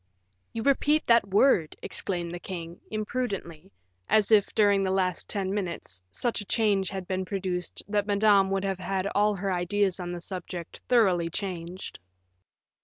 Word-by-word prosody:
"You 225 - -4
repeat 290 +3 +3
that 235 -3 +4
word," 195 - +3
exclaimed 175 -3 -3
the 175 - -5
king, 170 -2 -7
imprudently, 205 -6 -4 0.4
as 215 0 +3
if, 210 -2 +5
during 205 -2 +4
the 190 - 0
last 185 -2 0
ten 195 -2 -1
minutes, 170 - -3
such 225 - -1
a - - -8
change 200 -3 +1
had 190 -2 -5
been 185 -1 -1
produced 185 -2 -3
that 205 0 0
Madame 200 -1 +4
would 195 0 0
have 195 -1 -2
had 190 +1 -2
all 210 0 +3
her 195 0 -2
ideas 190 +2 0
on 175 -1 -4
the 175 - -4
subject 175 -1 -7
thoroughly 185 -9 +3
changed. 180 0 -5
195 Hz, 160 wpm, -27 LUFS, 180-205 Hz, 0.4 s, if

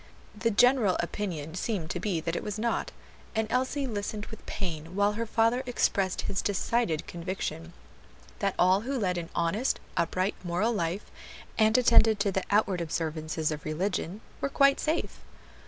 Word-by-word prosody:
The 230 +2 +1
general 230 -2 +4
opinion 170 -4 -3
seemed 185 -3 -2
to - - -2
be 190 -6 -1
that 165 +1 -2
it - - -1
was 210 0 -4
not, 235 +2 -1 0.4
and 220 0 +2
Elsie 260 +3 0
listened 210 -2 -3
with 220 - -9
pain 165 -3 -4
while 205 +1 +3
her 230 +2 -3
father 230 +3 +2
expressed 195 -6 +1
his 190 - -2
decided 200 -4 0
conviction 170 - -5 0.7
that 195 -1 0
all 185 +2 +4
who 265 +4 -2
led 180 -6 0
an 165 - -6
honest, 185 +10 +1 0.2
upright, 185 +3 +1
moral 180 +7 +1
life, 175 0 -2 0.4
and 220 +1 +4
attended 230 -3 +5
to 200 - +2
the 190 - 0
outward 200 -3 +2
observances 155 -1 -2
of 150 -1 -5
religion, 180 +4 -2 0.2
were 275 - 0
quite 275 0 +4
safe. 315 +2 -1
200 Hz, 160 wpm, -29 LUFS, 170-225 Hz, 0.7 s, attended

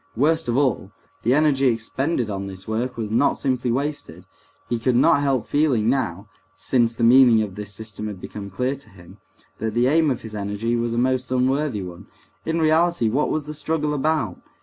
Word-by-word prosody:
Worst 160 +5 +2
of 120 +1 0
all, 130 -8 0 0.3
the 125 +3 +2
energy 145 -3 +3
expended 125 +3 -1
on 100 -1 -4
this 95 0 -9
work 115 +4 -2
was 110 -2 -4
not 120 +6 +3
simply 125 -3 -1
wasted. 125 - -4 0.4
He 120 - -1
could 125 +1 +1
not 135 +3 +4
help 135 -5 0
feeling 130 -7 +2
now, 100 -7 -2 0.3
since 115 +1 +1
the 115 - -2
meaning 120 -2 +6
of 100 -3 -6
this 105 +1 -7
system 105 0 -6
had 105 -3 -7
become 100 +1 -8
clear 125 +8 -1
to 140 -4 -15
him, 90 -3 -16 0.4
that 110 0 -3
the 120 +1 +3
aim 155 +3 +3
of 130 - -2
his 110 -1 -9
energy 105 +3 -2
was 120 0 -1
a - - -2
most 130 +1 0
unworthy 130 -3 0
one. 90 -1 -10 0.4
In 165 +1 0
reality, 160 -5 +2
what 135 +7 0
was 155 -2 -2
the 150 - -6
struggle 150 0 -1
about? 150 - -1
120 Hz, 195 wpm, -22 LUFS, 110-140 Hz, 0.4 s, meaning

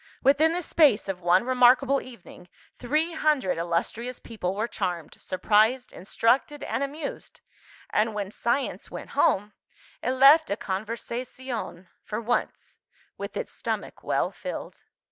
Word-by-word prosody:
Within 295 +4 +4
the 355 +1 -1
space 290 -12 +3
of 190 -2 -4
one 175 +3 +4
remarkable 255 +2 +4
evening, 200 -7 -13 0.3
three 305 +7 0
hundred 295 - +1
illustrious 185 +9 -2
people 195 -5 -4
were 220 +3 -1
charmed, 175 -8 -4
surprised, 215 +7 +2
instructed, 245 +9 0
and - - -2
amused; 280 +1 -5 0.5
and 215 0 +1
when 200 -2 -3
Science 240 +5 -2
went - - -8
home, 205 +2 +2 0.5
it 255 - 0
left 280 +5 +7
a 200 - -1
conversazione 230 0 -5 0.2
(for 215 - -4
once) 235 +2 -3 0.4
with - - -5
its - - -4
stomach - - -4
well - - 0
filled. - - -7
235 Hz, 130 wpm, -26 LUFS, 200-275 Hz, 0.5 s, left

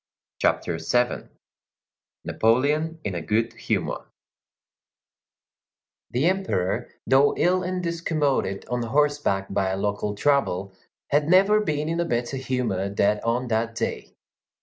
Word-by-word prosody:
CHAPTER - - 0
VII—NAPOLEON 140 +4 -2
IN 100 - -3
A 85 - -3
GOOD 110 +8 0
HUMOR - - -3 2.0
The 125 +5 0
Emperor, 125 - 0 0.2
though 135 +2 +4
ill 185 +1 +2
and 180 0 -3
discommoded 155 - -1
on 125 +1 -2
horseback 140 -5 +1
by 95 -1 +1
a 95 - -2
local 105 +1 -2
trouble, 100 -8 +1 0.4
had 145 +2 +2
never 195 +4 +5
been 150 -5 -1
in 165 +1 -1
a 170 - +1
better 120 -1 -2
humor 125 -7 -1
than 100 +1 +1
on 120 +3 -1
that 115 0 0
day. - - -4
125 Hz, 120 wpm, -24 LUFS, 105-155 Hz, 2.0 s, never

